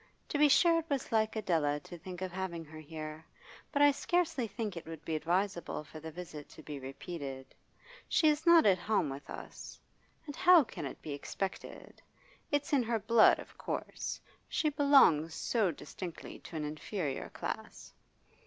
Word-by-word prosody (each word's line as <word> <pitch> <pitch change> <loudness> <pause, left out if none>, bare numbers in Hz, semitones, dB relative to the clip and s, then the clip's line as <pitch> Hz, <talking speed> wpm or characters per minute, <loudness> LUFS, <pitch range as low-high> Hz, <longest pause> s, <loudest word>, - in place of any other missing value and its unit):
To 295 - -1
be 300 0 +6
sure 335 +3 +5
it 330 - -8
was 280 -3 -2
like 220 -1 +2
Adela 160 -9 +1
to 175 - -10
think 180 +1 -7
of 185 - -3
having 175 -3 -4
her 155 +1 -11
here, 155 0 -7 0.5
but 285 - +3
I 290 - +8
scarcely 325 -3 0
think 210 -1 -4
it 170 - -8
would 165 -1 -8
be 160 - -1
advisable 175 +1 -1
for 155 +1 -11
the 160 +1 -7
visit 160 -3 -9
to 155 - -13
be 145 -2 -6
repeated. 135 -1 -7 0.6
She 315 - +4
is 300 +1 +3
not 335 -1 +8
at 190 -3 +5
home 175 -7 +1
with 140 +2 -8
us. - - -9 0.5
And 290 -2 -7
how 360 -3 +7
can 155 - -6
it - - -10
be 155 - -5
expected? 190 +6 -6 0.5
It's 290 0 0
in 275 - +5
her 230 -1 0
blood, 220 +1 +5
of - - -11
course; - - -4 0.3
she 305 - +1
belongs 270 - +5
so 220 -6 +1
distinctly 170 +2 -7
to - - -9
an 155 -1 -2
inferior 150 0 -4
class. - - -6
185 Hz, 175 wpm, -32 LUFS, -, 0.6 s, I